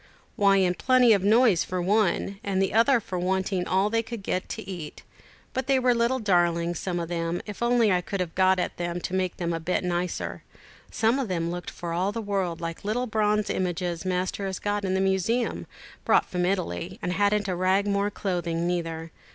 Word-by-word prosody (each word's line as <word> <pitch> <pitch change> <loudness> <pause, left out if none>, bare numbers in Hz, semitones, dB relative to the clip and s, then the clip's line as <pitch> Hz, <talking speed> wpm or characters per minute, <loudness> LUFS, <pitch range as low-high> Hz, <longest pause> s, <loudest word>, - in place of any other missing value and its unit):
"Why, 200 -1 +4
in 185 -2 +3
plenty 250 +3 +4
of 200 - +2
noise 215 -3 +4
for 185 - -3
one, 195 +1 +1
and 195 -1 -1
the 190 0 +1
other 235 +4 +4
for 185 -4 -5
wanting 190 0 -1
all 190 +3 +2
they 230 0 +2
could 225 -2 -7
get 185 -1 -2
to 220 - -6
eat. 175 -6 -7 0.5
But 260 0 -2
they 270 -1 +4
were 250 -1 +3
little 235 +2 +1
darlings, 175 -5 +1
some 180 -2 -2
of 170 - -3
them, 170 0 -2
if 210 0 -8
I 235 - +2
only 225 -7 +3
could 195 +2 -4
have 175 -3 -2
got 190 0 +3
at 180 - -2
them 175 0 -3
to 180 - -5
make 185 -1 -1
them 170 -1 -2
a 165 - -2
bit 175 +4 -1
nicer. 180 0 -2 0.5
Some 230 +4 +1
of 265 - -1
them 170 -3 -1
looked 175 0 -5
for 170 -1 -6
all 185 +4 0
the 230 - -4
world 195 -5 -2
like 165 -1 -5
the - - -8
little 245 +4 0
bronze 210 -2 +1
images 175 -1 -2
Master 185 +2 -2
has 190 -1 -3
got 205 0 -2
in 190 -1 0
the 190 - +1
museum, 195 +5 0 0.4
brought - - +4
from 180 -1 -1
Italy, 90 - -2
and 180 - -2
hadn't 205 +1 +1
a 185 - -1
rag 185 +3 +2
more 200 0 +1
clothing 175 -4 -2
neither. 165 -2 -3
190 Hz, 215 wpm, -26 LUFS, 175-210 Hz, 0.5 s, Why